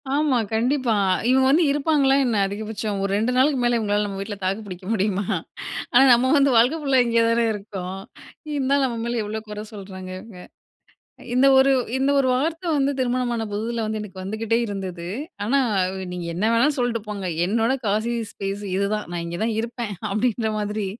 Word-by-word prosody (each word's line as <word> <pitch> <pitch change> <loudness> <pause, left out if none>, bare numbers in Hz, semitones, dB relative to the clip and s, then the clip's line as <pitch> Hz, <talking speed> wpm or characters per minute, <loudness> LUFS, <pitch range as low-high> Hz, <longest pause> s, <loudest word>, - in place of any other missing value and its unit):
ஆமா. 295 -4 +2 0.2
கண்டிப்பா. 245 0 +1 0.3
இவுங்க 260 +1 +4
வந்து 325 +5 +4
இருப்பாங்களா 285 -2 +2
என்ன 230 -4 +1
அதிகபட்சம் 210 0 -4
ஒரு 195 - -1
2 225 +4 +1
நாளுக்கு 270 0 +3
மேல 240 -1 +3
இவுங்களால 210 -1 0
நம்ம 195 -1 -6
வீட்ல 205 +1 -5
தாக்கு 195 +4 -1
பிடிக்க 185 -1 -9
முடியுமா? 200 -1 0 0.7
ஆனா 260 +2 +7
நம்ம 255 +3 +3
வந்து 275 -1 +4
வாழ்க்கை 250 +8 +4
ஃபுல்லா 270 -3 +3
இங்கே 230 0 +3
தானே 230 0 +2
இருக்கோம். 195 -2 -6 0.6
இருந்தாலும் 275 0 +2
நம்ம 235 -2 -4
மேல 235 -1 -1
எவ்ளோ 215 +1 -4
குறை 210 0 -5
சொல்றாங்க 190 -2 -8
இவுங்க. 185 -3 -12 0.8
அ - - -13
இந்த 260 +2 +5
ஒரு, 270 +1 +5 0.3
இந்த 270 +1 +2
ஒரு 260 - +1
வார்த்தை 325 +6 -1
வந்து 280 0 +2
திருமணமான 245 -2 0
புதுதில 225 +2 -2
வந்து 215 0 -3
எனக்கு 190 -2 -9
வந்துக்கிட்டே 220 +4 -1
இருந்தது. 185 -4 -5 0.4
ஆனா, 270 +6 +2 0.4
வ் 190 -1 -5
நீங்க 175 -1 -5
என்ன 185 - -2
வேணாலும் 275 +6 +3
சொல்ட்டு 240 -3 0
போங்க! 200 -3 -4 0.2
என்னோட 230 +5 +1
காஷிஸ் 225 +2 -1
ஸ்பேஸ் 200 +1 -4
இதுதான். 205 +2 -1
நான் 170 -1 -3
இங்கே 170 +2 -5
தான் 225 -1 -1
இருப்பேன், 230 -2 -4 0.2
அப்பிடின்ற 220 +1 0
மாதிரி 210 -1 -2
225 Hz, 175 wpm, -23 LUFS, 200-255 Hz, 0.8 s, ஆனா